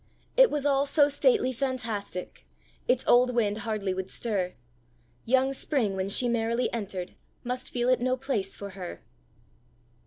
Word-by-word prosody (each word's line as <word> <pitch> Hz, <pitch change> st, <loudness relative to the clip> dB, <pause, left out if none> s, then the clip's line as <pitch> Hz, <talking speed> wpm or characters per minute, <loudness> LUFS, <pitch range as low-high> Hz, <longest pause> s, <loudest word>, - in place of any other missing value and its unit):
It -, -, +7 dB
was 295 Hz, -1 st, -2 dB
all 280 Hz, 0 st, +3 dB
so 290 Hz, 0 st, +4 dB
stately 350 Hz, -, +2 dB
fantastic, 225 Hz, -8 st, -4 dB, 0.4 s
Its 250 Hz, 0 st, +2 dB
old 250 Hz, 0 st, +4 dB
wind 215 Hz, -2 st, +1 dB
hardly 215 Hz, -4 st, -2 dB
would 190 Hz, 0 st, -4 dB
stir: 195 Hz, -6 st, -2 dB, 0.7 s
Young 265 Hz, +3 st, +3 dB
Spring, 255 Hz, -8 st, 0 dB
when 190 Hz, 0 st, -2 dB
she 245 Hz, +5 st, +2 dB
merrily 235 Hz, +1 st, 0 dB
entered, 195 Hz, -5 st, -4 dB, 0.3 s
Must 250 Hz, +1 st, -3 dB
feel 240 Hz, 0 st, 0 dB
it 255 Hz, -1 st, +3 dB
no 255 Hz, +1 st, +1 dB
place 245 Hz, -8 st, -2 dB
for 200 Hz, -1 st, -7 dB
her! 185 Hz, -2 st, -8 dB
240 Hz, 150 wpm, -28 LUFS, 200-260 Hz, 0.7 s, It